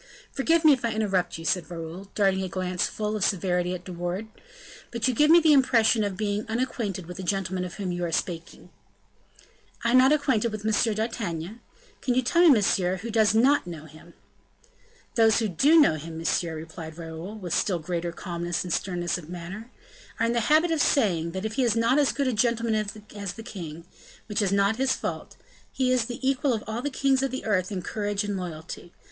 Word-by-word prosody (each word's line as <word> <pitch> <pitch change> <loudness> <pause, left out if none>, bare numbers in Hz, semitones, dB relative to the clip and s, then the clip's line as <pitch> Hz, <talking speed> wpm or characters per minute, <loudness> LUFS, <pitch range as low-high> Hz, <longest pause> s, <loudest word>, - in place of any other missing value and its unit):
"Forgive 325 +4 +1
me 305 - +9
if 260 - -2
I 230 -1 0
interrupt 195 -6 0
you," 165 - -9
said 180 +1 0
Raoul, 170 +2 -7
darting 195 -2 +2
a 190 - -3
glance 180 0 -1
full 215 0 -3
of 210 - -1
severity 180 -2 0
at 180 - -8
De 185 - -7
Wardes; 175 +5 -4 0.6
"but 235 0 -1
you 255 - +2
give 300 +6 +3
me 335 +2 +8
the 315 -2 +5
impression 235 -5 +4
of 200 -2 -3
being 210 0 -1
unacquainted 220 -6 -2
with 180 +1 -9
the - - -5
gentleman 185 -1 -1
of 180 0 -6
whom 190 -2 -3
you 175 0 -3
are 170 - -2
speaking." 165 0 -4 1.1
"I 235 +1 +2
not 255 +2 +6
acquainted 265 -7 +2
with 215 -1 -6
M. 220 0 +2
d'Artagnan? 215 -3 -4 0.4
Can 250 - 0
you 255 - +2
tell 335 +8 +2
me, 350 - +7
monsieur, 195 -7 +3
who 225 +5 -6
does 220 -1 +3
not 260 -1 +4
know 160 -3 -7
him?" 155 0 -16 1.0
"Those 225 -2 +4
who 225 - +1
do 280 - +4
know 220 - +4
him, 160 +2 -8
monsieur," 165 0 -1
replied 160 0 -8
Raoul, 165 +4 -7
with 180 -5 -5
still 185 -4 +1
greater 170 +1 -3
calmness 175 -1 -3
and 180 - -3
sternness 175 -2 -1
of 160 -2 -13
manner, 180 +6 -7 0.5
"are 230 - +2
in 230 - +1
the 235 +1 0
habit 315 +3 +4
of 320 -2 +1
saying, 175 - +2
that 190 +2 -4
if 220 - -3
he 265 - +1
is 235 -3 +2
not 230 +5 +3
as 285 - +3
good 280 -1 -1
a 255 - +1
gentleman 230 0 +1 0.4
as 200 -3 -4
the 225 - -10
king 170 -8 -8 0.4
which 210 0 -1
is 195 -2 +1
not 200 +2 +2
his 265 0 +2
fault - - -5 0.4
he 255 -1 0
is 250 -3 +2
the 245 +2 -4
equal 270 0 +2
of 220 - -3
all 220 +2 -4
the 290 - -2
kings 270 -1 +1
of 270 - 0
the 260 +1 -5
earth 185 -2 0
in 185 -3 -4
courage 205 +1 -2
and 205 -1 -3
loyalty. 170 -1 -7
205 Hz, 215 wpm, -26 LUFS, 175-235 Hz, 1.1 s, me